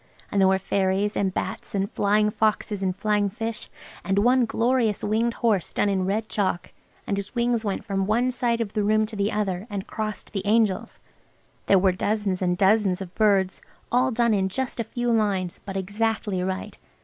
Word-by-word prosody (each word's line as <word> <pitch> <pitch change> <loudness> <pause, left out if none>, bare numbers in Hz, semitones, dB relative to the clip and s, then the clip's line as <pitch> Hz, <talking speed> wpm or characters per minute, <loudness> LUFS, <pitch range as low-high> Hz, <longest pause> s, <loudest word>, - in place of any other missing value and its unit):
And 200 - +2
there 190 - +6
were 190 0 +4
fairies, 195 +1 0
and 195 -1 +1
bats, 185 - -4
and 195 0 +1
flying 210 +1 +2
foxes, 210 -1 0
and 185 -2 0
flying 205 0 +1
fish. 225 +2 -5 0.3
And 195 0 0
one 245 +4 +4
glorious 230 -1 +1
winged 225 +3 +1
horse 215 -7 +1
done 205 - +1
in 190 -2 0
red 215 +3 -1
chalk–and 200 0 -3
his 200 +5 -5
wings 235 -1 +1
went 200 -2 -3
from 195 -2 -1
one 240 +4 +2
side 240 -2 0
of 210 -3 -3
the 210 - 0
room 215 +1 +3
to 215 0 -8
the 200 +1 0
other, 200 -1 -2
and 200 -2 -4
crossed 215 -1 -5
the 195 -2 -2
angel's. 210 -2 +1 0.7
There 195 - +6
were 190 0 +4
dozens 200 0 -1
and 180 -1 +1
dozens 195 -1 +3
of 190 -2 -8
birds–all 215 +5 +1
done 235 -2 +2
in 190 -2 +1
just 255 +5 -3
a - - +1
few 240 +2 -2
lines–but 195 -3 -1
exactly 205 0 -1
right. 190 +1 -4
205 Hz, 185 wpm, -25 LUFS, 195-225 Hz, 0.7 s, there